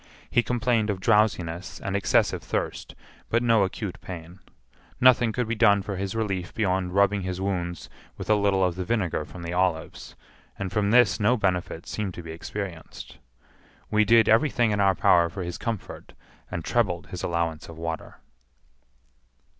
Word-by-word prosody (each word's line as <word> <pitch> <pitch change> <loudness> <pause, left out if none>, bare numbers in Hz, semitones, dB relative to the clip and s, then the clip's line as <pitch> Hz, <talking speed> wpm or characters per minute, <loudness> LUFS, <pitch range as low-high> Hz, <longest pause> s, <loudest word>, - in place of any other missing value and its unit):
He 120 - +4
complained 120 -3 0
of 100 -2 -1
drowsiness 95 -4 +1
and 100 - -3
excessive 100 - +2
thirst, - - -4 0.3
but 115 +1 +1
no 115 -3 +4
acute 95 0 -4
pain. 90 0 -9 0.6
Nothing 120 -2 +5
could 125 +1 -2
be 115 - -1
done 105 -3 +4
for 100 0 -4
his 95 +2 -4
relief 95 -5 -3
beyond 95 -3 0
rubbing 100 0 +3
his 95 0 -4
wounds 90 -3 -3 0.3
with - - -7
a 110 - +4
little 100 -2 +2
of 90 -1 +1
the 90 +1 -4
vinegar 90 -7 -1
from 90 +2 -10
the 85 +1 -4
olives, 90 -2 -2 0.4
and 95 -2 -4
from 105 -1 +1
this 120 -2 +4
no 120 +4 +3
benefit 90 -5 -1
seemed 100 -4 -4
to 85 - -8
be 80 - -8
experienced. 85 +1 -7 0.7
We 110 0 +4
did 115 0 +5
every 115 +7 +4
thing 120 -4 +1
in 105 - 0
our 95 -1 +4
power 85 -1 +4
for 95 +2 -6
his 85 0 -5
comfort, 115 -5 -5 0.4
and 85 - -5
trebled 100 -7 0
his 90 - -6
allowance 85 -2 -2
of 80 - -10
water. 80 0 -6
95 Hz, 170 wpm, -26 LUFS, 90-110 Hz, 0.7 s, Nothing